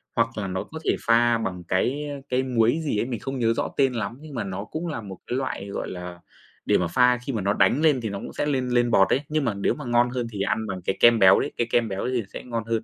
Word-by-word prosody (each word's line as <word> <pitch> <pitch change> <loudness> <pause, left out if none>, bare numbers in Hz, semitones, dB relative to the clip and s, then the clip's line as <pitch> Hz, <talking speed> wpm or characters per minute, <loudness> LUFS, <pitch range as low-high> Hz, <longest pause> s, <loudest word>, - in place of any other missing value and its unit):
hoặc 115 0 +3
là 100 - -2
nó 95 0 -3
có 160 - -9
thể - - +2
pha 115 0 +4
bằng 95 -5 -4
cái, 135 +12 0
ơ, 140 -1 -6
cái 130 +1 +1
muối 120 +2 +2
gì 145 -8 -1
ấy, - - 0
mình 120 -3 -4
không 135 -1 -5
nhớ 115 -1 +2
rõ - - -2
tên 135 -2 +3
lắm 115 0 -3
nhưng 155 -2 -10
mà 115 - -2
nó 100 +2 -5
cũng 165 +7 -5
là 150 -7 -4
một 95 -3 -9
cái 125 - -1
loại, 130 -7 -3
gọi 100 - -4
là, 90 -1 -7 0.5
để - - +3
mà 85 - 0
pha 125 +6 +4
khi 135 - -3
mà 110 - -1
nó 100 +2 +1
đánh 100 +10 +3
lên 150 -6 +3
thì 110 - -3
nó 100 - -5
cũng - - -8
sẽ - - -1
lên 130 -4 0
lên 120 -1 +2
bọt 95 -4 +5
ấy, 135 - +2
nhưng 150 -2 0
mà 110 - +1
nếu 100 - 0
mà 150 - -8
ngon 120 0 +3
hơn 125 -2 -3
thì 100 - -4
ăn 110 +2 -1
bằng 95 -2 -5
cái 95 - -1
kem 120 -1 +6
béo 95 -2 +7
đấy, - - -2
cái 120 - 0
kem 120 -1 +2
béo 95 -1 -4
ấy 125 - -2
thì 120 - 0
sẽ - - -7
ngon 115 -2 -3
hơn. 115 -1 -1
115 Hz, 310 wpm, -24 LUFS, 100-130 Hz, 0.5 s, béo